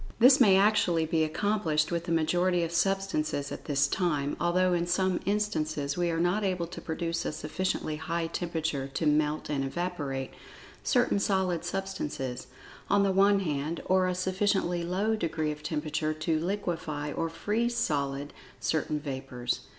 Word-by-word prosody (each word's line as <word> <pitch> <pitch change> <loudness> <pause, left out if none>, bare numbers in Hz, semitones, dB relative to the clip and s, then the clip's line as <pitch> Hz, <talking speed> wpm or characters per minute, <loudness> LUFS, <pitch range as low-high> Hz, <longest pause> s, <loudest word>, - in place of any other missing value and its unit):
This 255 +3 +7
may 195 -6 +7
actually 195 -5 +3
be 160 0 +1
accomplished 160 -2 0
with 170 0 -1
the 170 - -3
majority 175 +2 +2
of 165 - -2
substances 170 -5 0
at - - -7
this 140 -1 +2
time, 150 -4 0
although 180 +1 +2
in 175 0 0
some 185 0 +1
instances 155 -9 0
we 175 -1 0
are 165 -1 -1
not 180 +5 +1
able 185 -3 0
to 170 - -8
produce 165 +1 -2
a - - -2
sufficiently 155 0 -2
high 165 +2 -2
temperature 160 -5 -2
to 165 - 0
"melt 150 0 +1
and 145 -2 -1
evaporate" 140 -3 -3 0.5
certain 245 -5 +2
solid 190 -4 +1
substances, 150 -9 -4 0.4
on 200 0 +4
the 195 - +2
one 195 +1 +4
hand, 155 -1 -2
or 185 0 +3
a 180 - -1
sufficiently 185 -1 0
low 195 +6 0
degree 160 -6 -1
of 150 0 -7
temperature 155 0 -2
to 155 +1 0
"liquify" 165 -5 -3
or 165 0 -1
"freeze 215 +8 -1
solid" 145 -7 -1 0.3
certain 155 -1 0
vapors. 130 -4 -3
170 Hz, 160 wpm, -29 LUFS, 150-190 Hz, 0.5 s, This